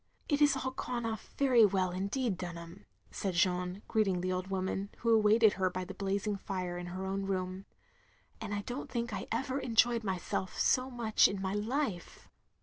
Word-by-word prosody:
" - - -35
It 290 -2 +2
has 295 -2 +5
all 260 -1 -2
gone 245 -2 -3
off 220 -2 -5
very 255 -5 +5
well, 190 -3 +3
indeed, 200 +5 -1
Dunham, 175 0 -8
" - - -43
said 190 -3 -3
Jeanne, 180 +2 +1
greeting 195 -5 +1
the 185 +1 -1
old 185 0 -2
woman, 190 +1 -2
who 230 0 +2
awaited 215 0 +5
her 190 -1 +1
by 185 0 -4
the 190 - -7
blazing 200 +1 -1
fire 185 -3 -4
in 175 0 -5
her 185 +2 -5
own 195 0 -2
room. 185 0 -3 0.8
And 215 -2 -5
I 205 0 -1
don't 245 +5 -5
think 235 -1 -3
I - - -4
ever 265 +3 -1
enjoyed 235 -1 +3
myself 190 -1 -3
so 255 +1 +2
much 235 -4 +3
in 200 - -4
my 190 0 -2
Ufe." 215 - -3
200 Hz, 195 wpm, -32 LUFS, 185-230 Hz, 0.8 s, has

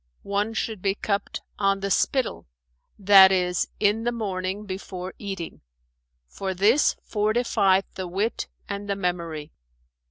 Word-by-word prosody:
"One 205 +3 -1
should 220 -3 -3
be 195 0 +1
cupped 200 -1 -3 0.2
'on 195 -1 +2
the 200 0 -2
spittle,' 260 - 0 0.5
that 195 -1 +8
is, 180 -1 +1
in 210 +2 +2
the 240 - +1
morning 200 -3 -3
before 185 -1 -6
eating, 195 -5 -6 0.7
for 190 - -4
this 220 +10 +4
fortifieth 210 -3 +2
the 185 -1 -5
wit 200 +6 -2 0.2
and 200 0 -5
the 200 - +1
memory. 170 -5 -3
195 Hz, 130 wpm, -25 LUFS, 185-210 Hz, 0.7 s, that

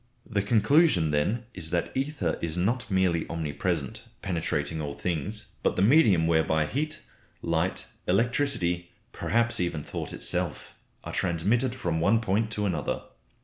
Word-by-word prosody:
The 100 -3 0
conclusion 105 - +4
then 100 +11 0
is 80 -4 -4
that 85 0 -1
ether 135 - -1
is 85 0 -2
not 115 +7 0
merely 95 -4 +1
omnipresent, 85 +7 -2 0.2
penetrating 80 -3 -1
all 70 -2 -4
things, 90 +7 -3 0.2
but - - +1
the 95 - +2
medium 105 - +5
whereby 80 -1 +2
heat, 155 - -3 0.4
light, 85 +2 0 0.2
electricity, 95 -5 +1 0.2
perhaps 120 +1 +1
even 85 -4 -1
thought - - -5
itself, - - -2 0.3
are - - -6
transmitted 105 +9 +1
from 85 -9 -1
one 100 +7 +4
point 110 0 0
to 105 -1 -1
another. 85 -7 -1
95 Hz, 140 wpm, -27 LUFS, 85-115 Hz, 0.4 s, medium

